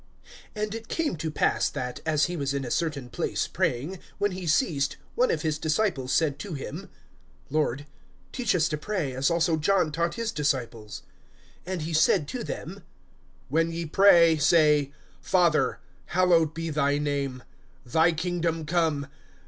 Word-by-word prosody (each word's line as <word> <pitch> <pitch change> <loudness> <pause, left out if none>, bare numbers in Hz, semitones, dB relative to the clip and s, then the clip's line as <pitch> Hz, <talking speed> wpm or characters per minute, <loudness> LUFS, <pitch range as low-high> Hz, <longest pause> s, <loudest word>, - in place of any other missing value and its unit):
AND 210 0 -2
it 225 0 -7
came 320 - -1
to 160 +1 -3
pass 150 - +1
that, 125 -1 -5
as 155 -2 +3
he 175 - -4
was 140 -3 -2
in 135 -1 -2
a 120 - -5
certain 150 -7 -1
place 125 - -2
praying, 150 +10 -2 0.2
when 205 0 +1
he 185 -1 -6
ceased, 155 - +1 0.2
one - - +2
of - - -1
his 155 -2 -1
disciples 155 -5 0
said 145 -4 +1
to 180 0 -5
him: 155 +7 -7 0.6
Lord, 145 -2 0 0.5
teach 240 -7 0
us 165 -3 +3
to 150 - -2
pray, 165 -6 -2
as 130 +2 +1
also 170 -1 +2
John 175 0 +2
taught 170 +2 -1
his 230 -1 -2
disciples. 120 - -3 0.6
(2)And 185 -3 -3
he 160 +2 -4
said 155 0 +3
to - - -4
them: - - -6 0.7
When 165 +4 +1
ye 165 0 -4
pray, 170 -2 +5
say; 150 -2 +4 0.3
Father, 175 -4 +2 0.3
hallowed 170 -3 +3
be 165 0 -3
thy 145 -1 +1
name. 140 -3 -2 0.4
Thy 160 +7 +3
kingdom 165 -1 -2
come. 155 -3 0
160 Hz, 160 wpm, -26 LUFS, 145-175 Hz, 0.7 s, pray